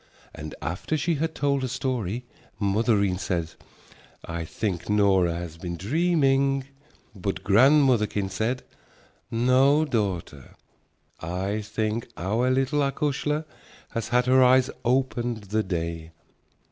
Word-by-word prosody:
And 75 -1 -8
after 90 - -2
she 170 +3 0
had 160 +1 -2
told 140 -1 +1
her 130 - -1
story, 125 -3 -3 0.3
mothereen 100 -2 +1
said, 85 -3 -2 0.7
"I 85 0 -4
think 90 0 -3
Nora 95 -5 +3
has 85 -2 -6
been 85 0 -5
dreaming," 135 - +2 0.5
but 100 -1 -4
grandmotherkin 115 -3 +4
said, 115 +6 -1 0.7
"No, 130 +6 +3
daughter, 95 - -3 0.6
I 95 +5 -2
think 110 +2 -2
our 110 +8 0
little 135 +3 +1
acushla 150 +2 0 0.4
has 115 - -3
had 125 +1 +2
her 130 +1 +5
eyes 130 +1 +4
opened 120 -3 0
the 105 +2 0
day." 85 -4 -4
115 Hz, 115 wpm, -25 LUFS, 95-135 Hz, 0.7 s, her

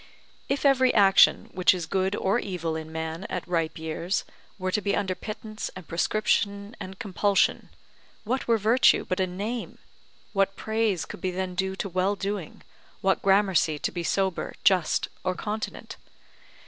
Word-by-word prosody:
If 275 +1 -1
every 260 -2 +5
action, 195 -2 +5
which 185 0 +4
is 175 -2 -4
good 190 +3 0
or 200 +5 +1
evil 170 -6 -3
in 160 0 -6
man 160 +3 -4
at - - -4
ripe 165 -1 -1
years, 160 +4 -2 0.3
were 185 -1 -2
to 210 - +1
be 200 0 0
under 190 -2 0
pittance 215 +2 -6
and 185 -3 -10
prescription 200 +3 0
and 190 0 -8
compulsion, 200 0 +1 0.5
what 250 +4 -2
were 230 -1 +4
virtue 225 +4 +4
but 185 - -1
a 185 - +2
name, 210 +7 -4 0.6
what 195 -1 +1
praise 220 -4 0
could - - -9
be 185 - 0
then 185 0 -3
due 190 +1 -1
to 195 - -3
well 185 +2 0
doing, 195 -4 -5 0.4
what 190 0 +2
gramercy 190 -5 +3
to - - -2
be 175 - -4
sober, 190 +1 -1
just, 185 -5 +3 0.2
or 185 0 0
continent? 215 +4 -5
190 Hz, 160 wpm, -26 LUFS, 180-210 Hz, 0.6 s, every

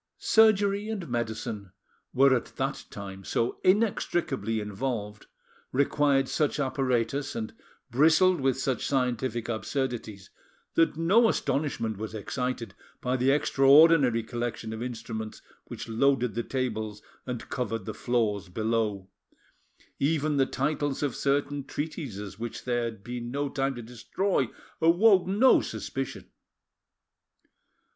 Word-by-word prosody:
Surgery 205 -1 +3
and 200 -6 -4
medicine 110 -4 -4 0.4
were 135 0 +5
at 120 - -4
that - - -2
time 95 -1 -8
so 115 +5 -1
inextricably 175 - +1
involved, 105 0 -4 0.4
required 140 0 +2
such 150 -1 0
apparatus, 130 0 0
and 110 -1 -4 0.4
bristled 160 +6 +4
with 135 0 +1
such 130 -3 -1
scientific 125 -3 -1
absurdities, 115 -3 -3 0.4
that 165 -2 +2
no 205 +8 +4
astonishment 135 - -1
was 110 +1 -6
excited 120 0 -3 0.3
by 125 0 -1
the 130 +1 +2
extraordinary 140 -2 +5
collection 120 -1 -4
of 110 - -6
instruments 115 -3 -6 0.2
which - - -7
loaded 125 0 +2
the 120 - -1
tables 110 -5 -3 0.2
and 125 -2 -5
covered 115 -5 -3
the 110 - -4
floors 110 -6 -1
below: 110 -1 -1 0.9
even 150 0 +1
the 135 -1 +3
titles 145 0 -1
of 140 -4 -1
certain 140 0 0
treatises 125 - -5
which 115 0 -6
there 120 -1 0
had 110 -4 -6
been 120 0 -5
no 140 +2 -2
time 135 0 -1
to 120 - -7
destroy, 125 - -1 0.3
awoke 180 +3 +5
no 210 +7 +5
suspicion. - - -5
125 Hz, 120 wpm, -28 LUFS, 115-145 Hz, 0.9 s, were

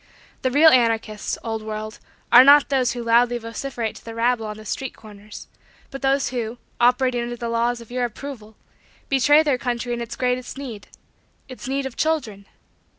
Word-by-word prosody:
The 260 - +1
real 305 +5 +6
anarchists, 225 -4 +1
old 225 -1 -3
world, 215 0 -6 0.3
are 250 - +10
not 285 +1 +6
those 260 -4 +1
who 240 -1 -5
loudly 240 +1 +3
vociferate 230 0 -5
to - - -15
the 225 0 -9
rabble 230 -1 0
on 210 0 -6
the 215 - -12
street 265 +4 -4
corners 210 -1 -12 0.4
but 270 - -7
those 270 0 +1
who, 240 -2 -4 0.2
operating 245 0 +2
under 240 0 -4
the 235 0 -5
laws 235 +1 0
of 235 - -14
your 250 0 -1
approval, 230 -3 -8 0.5
betray 290 +3 +5
their 280 -5 0
country 245 -1 -2
in 235 - -4
its 235 - -6
greatest 250 +1 -2
need 240 -7 -8 0.6
its 255 0 -9
need 275 +1 -2
of 265 - -6
children. 245 -11 -2
240 Hz, 180 wpm, -22 LUFS, 225-265 Hz, 0.6 s, are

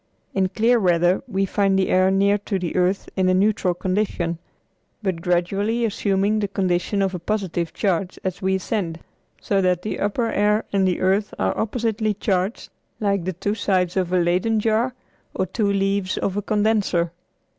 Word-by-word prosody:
In 190 -1 +1
clear 230 +5 +3
weather 175 -1 +3
we 195 +1 0
find 195 0 +1
the 190 - +1
air 185 +1 +4
near 200 +2 +3
to 200 0 -2
the 180 -3 -4
earth 185 +2 +1
in 185 -1 +2
a 185 - +3
neutral 190 -2 +2
condition, 180 -3 -1 0.6
but 185 -4 -1
gradually 195 +7 0
assuming 205 0 +1
the 205 - 0
condition 195 +1 0
of 190 -1 -1
a 180 - -3
positive 175 -3 -2
charge 190 -2 -1
as 185 -1 -3
we 190 0 +1
ascend; 180 -4 -3 0.4
so 195 -1 0
that 180 -1 +1
the 215 - -3
upper 205 +4 0
air 210 +2 +2
and 195 -1 +3
the 180 - -1
earth 195 +3 +1
are 95 0 0
oppositely 220 -1 -1
charged 195 +1 -1 0.3
like 200 -4 0
the 185 - -2
two 200 +4 -2
sides 185 -4 0
of 185 -2 0
a 185 - +3
Leyden 180 +6 +2
jar 225 +4 +1 0.4
or 190 - 0
two 205 +2 0
leaves 195 -1 0
of 195 - -1
a 205 - 0
condenser. 205 -5 +1
195 Hz, 175 wpm, -22 LUFS, 180-210 Hz, 0.6 s, air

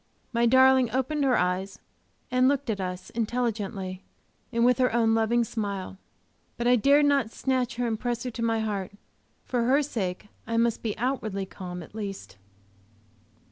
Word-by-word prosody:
My 235 0 +3
darling 260 0 +5
opened 265 +5 -1
her 255 -2 +3
eyes 185 +2 -1 0.5
and 255 0 +4
looked 280 -3 +1
at 200 -2 -3
us 180 0 -5
intelligently, 215 -5 -2 0.5
and 235 +1 +2
with 250 0 +4
her 250 -1 +3
own 225 -1 +3
loving 225 +2 +2
smile. 200 -4 -4 0.6
But 235 - -2
I 245 +1 +5
dared 280 +5 +4
not 280 -5 +2
snatch 255 0 -1
her 245 +1 -1
and 225 -2 -1
press 240 -1 -2
her 250 - -4
to 230 - -6
my 225 -1 +1
heart; 200 -3 -3 0.5
for 245 -2 0
her 275 +4 +3
sake 205 -7 -4 0.2
I 230 0 -1
must 230 -1 +1
be 215 -3 -3
outwardly 220 -6 -2
calm 180 -2 -7
at - - -15
least. 195 - -6
230 Hz, 170 wpm, -27 LUFS, 200-250 Hz, 0.6 s, darling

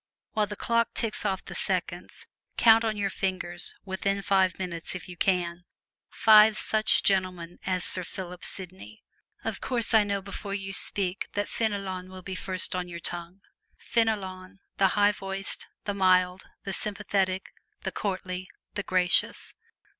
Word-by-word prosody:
While 210 -1 +1
the 210 - -6
clock 230 +2 +1
ticks 220 -2 -2
off 190 -2 -2
the - - -8
seconds, - - -3 0.3
count 225 0 +7
on 220 -2 -1
your 200 -1 0
fingers 180 -2 -2
within 195 +1 -1
five 190 -2 +3
minutes, 175 -2 -5
if 180 - -7
you 180 - -8
can 175 -1 0 0.5
five 215 0 +7
such 215 0 +4
gentlemen 185 -3 0
as 185 -1 0
Sir 180 - +1
Philip 180 0 -7
Sidney! 190 +3 -8 0.4
Of - - -3
course, 235 -3 +1
I 220 -1 +7
know 200 -1 -1
before 200 +1 -5
you 195 -1 -5
speak 195 -1 0
that 205 0 -1
Fenelon 195 -4 -2
will 185 0 -10
be 190 - -5
the 185 - -5
first 185 -1 -1
on 180 -1 -2
your 170 -1 -7
tongue. 175 +2 -5 0.4
Fenelon, 200 -4 -1 0.2
the 195 -1 +4
low 205 0 +6
voiced, 195 -1 -5 0.2
the 205 - -1
mild, 185 -1 +3 0.2
the 195 - -4
sympathetic, 195 -3 -1 0.3
the - - -2
courtly, 185 -2 -3 0.3
the 205 - -2
gracious! 185 -2 +2
190 Hz, 155 wpm, -28 LUFS, 185-205 Hz, 0.5 s, count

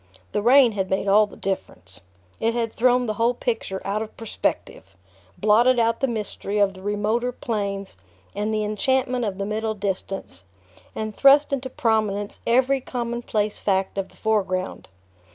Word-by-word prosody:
The - - 0
rain 250 +2 +6
had 190 -3 -2
made 190 +1 -1
all 210 +2 +5
the - - -14
difference. 95 - -5 0.4
It 230 +1 0
had 230 -2 -1
thrown 250 +1 +3
the 215 - -1
whole 230 +3 +1
picture 225 -6 -2
out 205 +2 -1
of 220 - -7
perspective, 95 - -4 0.4
blotted 235 +4 +4
out 230 0 +2
the 270 - +1
mystery 210 -3 -3
of 200 -1 +3
the 185 - -13
remoter 210 +5 0
planes 200 - -4 0.4
and 210 +1 -2
the 215 -1 0
enchantment 250 +3 0
of 195 -3 -3
the 195 - -2
middle 220 +1 -2
distance, 195 - -4 0.5
and 215 -1 -4
thrust 280 +1 +5
into 260 -1 -2
prominence 220 -6 0
every 260 +3 +3
commonplace 235 -4 -2
fact 190 -1 0
of 195 - -3
the - - -22
foreground. 190 -4 -1
215 Hz, 160 wpm, -23 LUFS, 200-240 Hz, 0.5 s, rain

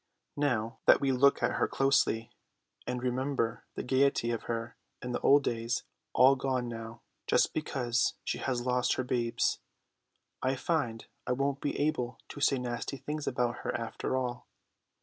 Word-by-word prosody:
Now 120 -5 0
that - - +8
we 135 -1 +1
look 140 +2 +4
at - - +3
her - - +1
closely 135 -4 +2 0.6
and 125 0 -3
remember 130 -2 -1
the - - -3
gaiety 130 -2 +2
of 115 - -3
her 115 0 -3 0.2
in 125 -2 -5
the - - -1
old 145 +1 +5
days, 115 0 -1 0.3
all 130 +2 +6
gone 130 -2 -1
now 115 0 -7 0.2
just - - +3
because 125 -6 0
she - - -2
has 125 -2 -2
lost 125 -1 +2
her 130 - -1
babes, 120 -2 0 0.8
I 130 +1 +1
find 130 -7 -1 0.2
I 125 - +2
won't 140 +1 -1
be 145 - -2
able 145 -5 0
to 145 - -8
say 140 - +4
nasty 125 +2 -3
things 150 +3 -5
about 120 0 0
her - - -2
after 115 +2 -3
all. 125 -1 -3
125 Hz, 165 wpm, -31 LUFS, 120-135 Hz, 0.8 s, that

